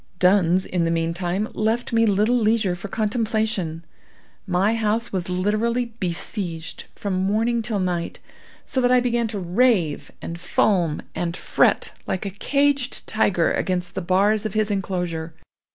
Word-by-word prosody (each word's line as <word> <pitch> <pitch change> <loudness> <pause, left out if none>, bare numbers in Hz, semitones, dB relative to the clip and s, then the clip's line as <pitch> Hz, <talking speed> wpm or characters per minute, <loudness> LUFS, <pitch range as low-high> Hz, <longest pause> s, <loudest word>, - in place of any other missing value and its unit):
Duns, 185 -1 +3
in 180 -2 -1
the 165 - +1
meantime, 175 +4 -1
left 225 +3 -1
me 230 0 +4
little 210 +4 +3
leisure 215 -5 +2
for 180 +3 -7
contemplation. 215 -6 -1 0.6
My 190 +4 +2
house 225 0 -1
was 185 -1 -2
literally 225 +6 0
besieged 175 -2 -3
from 200 -2 -3
morning 215 +5 +1
till 220 -2 -2
night, 175 -2 -2 0.5
so 265 - -1
that 245 0 +3
I 250 - +6
began 240 -1 0
to 215 -1 -5
rave, 185 - +1
and 170 +1 -6
foam, 175 -3 +1
and 170 0 -3
fret - - +2 0.2
like 190 - -2
a 200 - -3
caged 280 +5 0
tiger 190 -6 +2
against 180 -1 -1
the - - -3
bars 200 +4 +2
of 215 - -4
his 215 -1 +1
enclosure. 175 -5 -3
200 Hz, 150 wpm, -23 LUFS, 180-225 Hz, 0.6 s, I